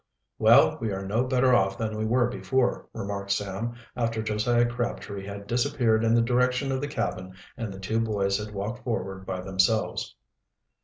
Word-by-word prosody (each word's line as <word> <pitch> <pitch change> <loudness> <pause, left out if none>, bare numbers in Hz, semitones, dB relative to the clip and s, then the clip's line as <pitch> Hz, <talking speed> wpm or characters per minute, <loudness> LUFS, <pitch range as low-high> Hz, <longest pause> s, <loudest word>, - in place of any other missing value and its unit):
"Well, - - +6
we 110 -2 -1
are 95 0 -4
no 110 +6 +1
better 130 0 +3
off 95 -4 +3
than 110 -1 -2
we 110 0 -2
were 120 +2 +3
before," 130 +1 0
remarked 100 0 -5
Sam, 100 +4 -2 0.2
after 115 -2 -1
Josiah 115 +3 +2
Crabtree 120 -5 -4
had 100 0 -7
disappeared 120 -1 +1
in 115 0 +3
the 115 - +4
direction 125 +3 +1
of 130 0 -1
the 145 - -2
cabin 95 -9 -3 0.2
and 115 -4 -4
the 95 - -8
two 110 +4 -1
boys 100 -3 0
had 105 - -8
walked 105 +5 -5
forward 95 -5 -3
by 95 -1 -3
themselves. 95 +3 0
110 Hz, 175 wpm, -27 LUFS, 100-120 Hz, 0.2 s, Well